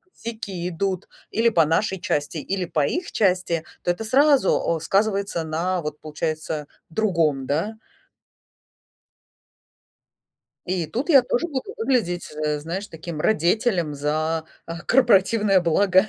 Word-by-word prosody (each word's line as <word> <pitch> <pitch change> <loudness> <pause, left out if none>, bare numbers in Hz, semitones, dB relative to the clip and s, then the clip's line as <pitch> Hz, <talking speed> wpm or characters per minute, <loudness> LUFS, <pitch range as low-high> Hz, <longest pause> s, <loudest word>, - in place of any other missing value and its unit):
сяки 200 -6 -5
идут 185 +1 -2 0.2
или 230 +1 +2
по 165 -7 +4
нашей 190 +4 0
части, 145 +2 -1
или 185 +4 -2
по 150 -4 0
их 350 0 -2
части. 180 -5 +1 0.2
То 175 - +2
это 175 +5 -4
сразу, 260 - +3
э, 160 - -9
сказывается 195 -2 0
на, 175 +3 -1
вот, 150 -1 -6
получается, 155 -1 -3 0.2
другом, 165 -8 +1
да. 165 +10 -1 2.9
И 180 -3 -1
тут 250 - -3
я 275 -6 +7
тоже 245 +6 0
буду 270 -5 -4
выглядеть, 225 -8 0
э, 150 0 0
знаешь, 170 +7 -5
таким 160 -1 -7
радетелем 175 - +1
за, 155 +3 -1 0.2
а, 165 0 -6
корпоративное 205 -3 +4
благо. 185 +4 +3
180 Hz, 125 wpm, -23 LUFS, 160-215 Hz, 2.9 s, я